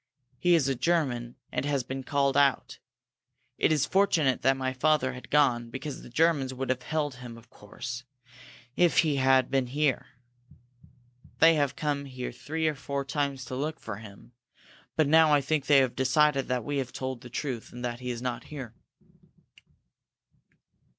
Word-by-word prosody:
He 175 -1 +4
is 150 -5 +2
a 135 - +1
German, 125 -4 -1 0.2
and - - -2
has 140 -2 0
been 130 +1 -5
called 140 0 +1
out. 135 -2 +2 0.8
It - - +3
is 150 -3 +2
fortunate 165 -9 +2
that 135 0 +3
my 130 0 -2
father 130 -1 +1
had 125 - -11
gone, 125 -5 +2
because 135 +3 -6
the - - -12
Germans 140 -1 +1
would 130 0 -2
have 130 -1 -2
held 145 -2 -2
him, 120 -2 -9
of 115 +1 -18
course, 120 +4 -8 0.7
if 175 -2 +3
he 155 -4 0
had 130 -1 +3
been 135 -2 +1
here. 145 +1 0 1.3
They 165 0 +6
have 145 -3 0
come 145 0 -2
here 130 -2 -6
three 160 +1 -3
or 155 - +1
four 140 0 -4
times 140 -1 -2
to 130 - -6
look 155 +4 -3
for 110 -3 -6
him, 105 +1 -13 0.6
but 155 -2 +3
now 160 +1 +5
I 145 - +5
think 140 +1 -1
they 145 - +6
have 130 -3 +2
decided 135 +1 +2
that 125 -2 -1
we 145 0 -2
have 130 -2 -3
told 130 -2 -5
the 125 - -11
truth, 125 -2 -4
and 120 0 -6
that 120 0 -4
he 125 -1 -5
is 120 0 -4
not 125 -1 -3
here." 130 -7 -8
135 Hz, 175 wpm, -28 LUFS, 125-150 Hz, 1.3 s, They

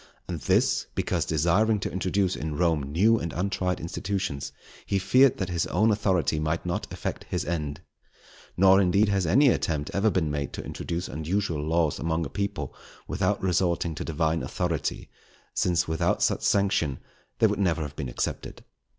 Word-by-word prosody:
And 85 -3 -4
this, - - +2
because - - 0
desiring 90 +8 +2
to - - -3
introduce 95 0 0
in 75 -1 -4
Rome 85 -4 +2
new 95 +12 +3
and 85 - -4
untried 90 0 -1
institutions, 95 -4 -3 0.3
he 100 - -1
feared 130 +7 +4
that 95 -2 -3
his 85 -2 -1
own 110 +6 +3
authority 95 -6 +1
might 75 0 -1
not - - -3
effect - - -5
his - - -2
end. 75 -4 -3 0.8
Nor, 95 +1 +6
indeed, 100 +3 +3
has 100 -3 +1
any 135 - +5
attempt 75 -10 -1
ever 100 +3 +3
been 80 -7 0
made 70 -1 -3
to - - -5
introduce 85 +1 -4
unusual 80 +2 -2
laws 80 -1 +1
among 80 0 -1
a - - -5
people, 100 -1 -3 0.3
without 95 +2 0
resorting 90 -2 +1
to 75 - -5
Divine 80 0 0
authority, 85 -4 -2 0.5
since 90 -1 +1
without 80 +2 0
such - - +1
sanction 95 -9 +1 0.4
they - - +4
never 90 -5 +1
would - - -2
have 70 - -20
been 70 -4 -4
accepted. - - -4
85 Hz, 165 wpm, -26 LUFS, 80-100 Hz, 0.8 s, Nor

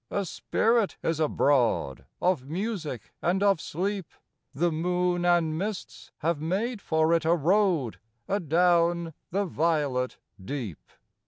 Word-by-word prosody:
A 200 -1 -1
spirit 225 +4 +1
is 165 -1 0
abroad 140 - +1
Of 175 -8 0
music 165 - -4
and 185 +4 +1
of 200 -5 +3
sleep; 190 +2 -3 0.4
The 170 +4 +1
moon 175 +2 0
and 170 -3 +3
mists 200 +4 -5
have 160 -1 0
made 200 +8 -1
for 160 -1 +2
it 165 -1 +2
a 165 +2 +3
road 170 - +2 0.3
Adown 170 -2 +2 0.2
the 200 +3 0
violet 150 -7 0 0.3
deep. 120 - -6
170 Hz, 120 wpm, -27 LUFS, 155-190 Hz, 0.4 s, of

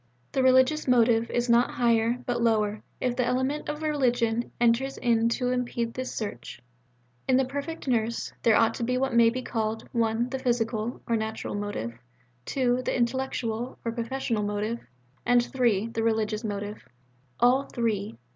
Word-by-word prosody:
The 265 - +1
religious 260 +4 +4
motive 235 -2 +4
is 240 0 0
not 235 +1 +4
higher, 235 0 +2
but 240 -1 -1
lower, 215 -2 +1 0.2
if 250 -1 0
the 250 - +1
element 260 +4 -1
of 300 +1 -4
religion 245 -6 +1
enters 240 +3 +2
in 230 -1 +2
to 250 +1 0
impede 240 -2 -2
this 255 0 -4
search. 165 - -6 0.7
In 255 - +4
the 265 - +3
perfect 285 +4 -5
nurse, 235 -2 0
there 225 -2 +4
ought 225 +1 +4
to 235 - -4
be 250 +2 0
what 265 0 0
may 235 -1 +6
be 255 +2 -4
called 225 -1 -2
(1) 230 +1 0
the 265 +1 -3
physical 235 -2 -1
(or 235 - +2
natural) 220 0 -3
motive, 205 - -4 0.5
(2) 250 -2 +1
the 255 - -1
intellectual 240 -1 -2
(or 230 - 0
professional) 235 -1 -2
motive, 210 +3 -2 0.4
and 245 0 +3
(3) 230 -5 +1
the 225 -1 -3
religious 220 -1 0
motive 205 0 -4 0.6
all 255 +3 +4
three. 210 - -2
235 Hz, 165 wpm, -27 LUFS, 225-255 Hz, 0.7 s, may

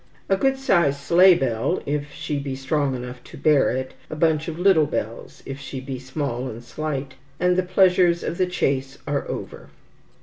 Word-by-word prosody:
A 195 - +4
good 270 +7 +1
sized 170 - +2
sleigh 180 +5 +6
bell, 130 +4 0
if 145 +1 -2
she 145 0 -3
be 140 -1 -4
strong 135 0 0
enough 125 0 -7
to - - -12
bear 150 -3 +4
it, 130 0 -3 0.2
a - - -5
bunch 155 -1 +1
of 165 -1 -4
little 180 -4 +4
bells, 115 -4 -5
if 135 0 -6
she 135 -1 -6
be 130 0 -6
small 130 -1 -3
and 115 0 -8
slight, 140 0 -4 0.3
and 180 0 +3
the 185 - +3
pleasures 180 -2 +3
of 170 - -4
the 185 - +3
chase 135 -6 -1
are 145 -1 -2
over. 70 - -6
145 Hz, 190 wpm, -23 LUFS, 130-175 Hz, 0.3 s, sleigh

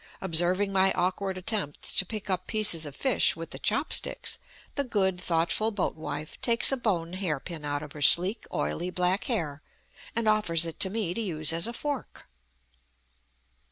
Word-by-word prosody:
Observing 185 +3 +2
my 190 0 +3
awkward 185 +1 -2
attempts 185 -5 -2
to 195 - +1
pick 215 0 -6
up 185 -2 -2
pieces 205 -8 +4
of 140 - -10
fish 260 - +3
with 165 0 -8
the - - -5
chop - - +1
sticks, - - +3 0.3
the 280 - -1
good, 190 -7 -1
thoughtful 170 +6 0
boat 205 -4 -2
wife 155 -1 -7
takes 235 +1 +4
a - - +2
bone 185 -9 -2
hair 180 -7 -2
pin 165 0 -8
out 145 0 -3
of 150 - -10
her 150 - -10
sleek, 180 - +5
oily 175 +2 -2
back 180 +2 0
hair, 160 - -2 0.5
and 230 -1 -1
offers 210 -6 +2
it 165 - -7
to 190 - +3
me 200 -4 -2
to 230 - -3
use 160 -6 +1
as 165 +5 0
a 235 - -5
fork! 285 +2 -5
185 Hz, 180 wpm, -27 LUFS, 165-215 Hz, 0.5 s, sleek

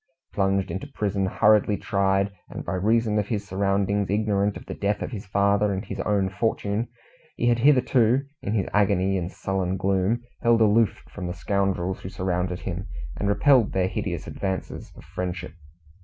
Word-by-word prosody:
Plunged 95 -1 +1
into 95 +9 -4
prison, 100 -7 -1
hurriedly 105 0 +3
tried, 100 0 +1 0.2
and - - -7
by - - -3
reason 110 +3 +2
of 105 - -1
his 105 -3 -3
surroundings 100 +1 0
ignorant 105 -1 +1
of - - -12
the - - -6
death 105 +1 -1
of - - -5
his 105 -5 -7
father 100 +1 +2
and 95 +2 -3
his 100 - -6
own 100 -1 +1
fortune, 105 +2 -1 0.5
he 120 - +1
had 120 0 +2
hitherto 125 -1 +4 0.2
in 105 - -2
his 100 - 0
agony 95 -2 +2
and 90 -1 -2
sullen 95 -1 -2
gloom 95 +4 +1 0.2
held 115 -1 +4
aloof 110 0 +3
from 90 -3 -5
the 90 - -4
scoundrels 95 -1 -1
who 95 - -7
surrounded 90 -1 -2
him, 95 +1 -4 0.3
and 100 - -1
repelled 115 +3 +4
their 95 -1 +2
hideous - - -3
advances 95 -1 -4
of - - -13
friendship. 90 -2 -5
100 Hz, 170 wpm, -25 LUFS, 95-105 Hz, 0.5 s, hitherto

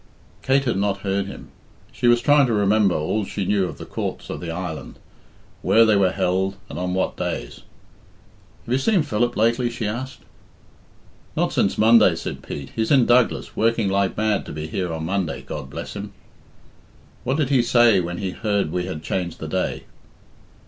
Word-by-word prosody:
Kate 135 +1 +2
had 120 -5 0
not 100 0 0
heard 100 0 -1
him. - - -10 0.4
She 120 - -1
was 120 0 +5
trying 145 +1 +5
to 115 - 0
remember 105 -2 +3
all 80 +8 -1
she 100 0 -4
knew 100 0 +2
of - - -8
the - - -8
courts - - -5
of - - -5
the 85 - -5
island 85 -2 -5 0.6
where 115 0 +5
they 110 -2 +4
were 100 -2 +4
held, 95 +1 0 0.2
and - - -5
on 90 0 -2
what 95 - -1
days. - - -4 1.0
"Have 120 - -2
you 130 - +2
seen 190 +3 +2
Philip 120 -3 -1
lately?" 115 +3 +2
she 120 -1 -4
asked. 125 +5 -5 1.2
"Not - - +1
since - - +1
Monday," 110 -5 +6
said 85 - -6
Pete. 70 -2 -7
"He's 110 -1 0
in 135 -5 +5
Douglas, 120 0 +2
working 115 -2 +1
like 100 0 0
mad 110 -1 +1
to - - -6
be 75 +1 -5
here 90 +2 -3
on 80 -1 -4
Monday, 95 -1 -2
God 70 -3 -7
bless - - -7
him!" 100 0 -7 1.1
"What 130 +3 0
did 145 -5 0
he 130 -3 +5
say 120 -4 +4
when 90 0 -3
he 95 -1 -3
heard 100 -5 -1
we 90 +1 -2
had 80 -5 -6
changed 90 0 -3
the 80 - -5
day?" 95 +3 -2
100 Hz, 190 wpm, -22 LUFS, 90-120 Hz, 1.2 s, Monday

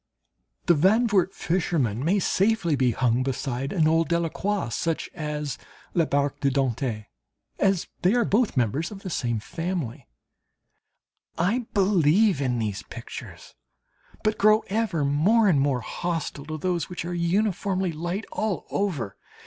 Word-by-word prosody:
"The 175 - +5
Zandvoort 195 +3 +3
Fisherman" 160 - -1
may 180 +7 +2
safely 195 -4 +2
be 130 -2 +2
hung 120 0 +1
beside 135 0 -2
an 160 -5 +2
old 165 +1 +3
Delacroix, 170 0 -1
such 165 +7 -2
as 150 -4 -4 0.3
"La 170 -2 +3
Barque 145 0 0
de 140 -1 +2
Dante," 130 -5 -1 0.5
as 195 -3 +2
they 185 +6 +3
are 240 -2 +3
both 215 - +1
members 130 +7 +1
of 200 -2 -10
the 185 - -5
same 120 -7 -1
family. 155 - -4 1.3
I 220 +8 0
believe 190 -2 +4
in 125 -3 0
these 105 -4 -2
pictures, - - -9 0.7
but 215 0 0
grow 215 +1 +5
ever 200 -8 0
more 190 +11 +3
and 150 -8 +4
more 135 -3 +1
hostile 160 0 -4
to 155 0 -4
those 175 0 -1
which 180 -2 -5
are 175 - -3
uniformly 185 +1 0
light 175 +6 -3
all 215 -4 -2
over. 155 - -2
165 Hz, 140 wpm, -25 LUFS, 140-195 Hz, 1.3 s, The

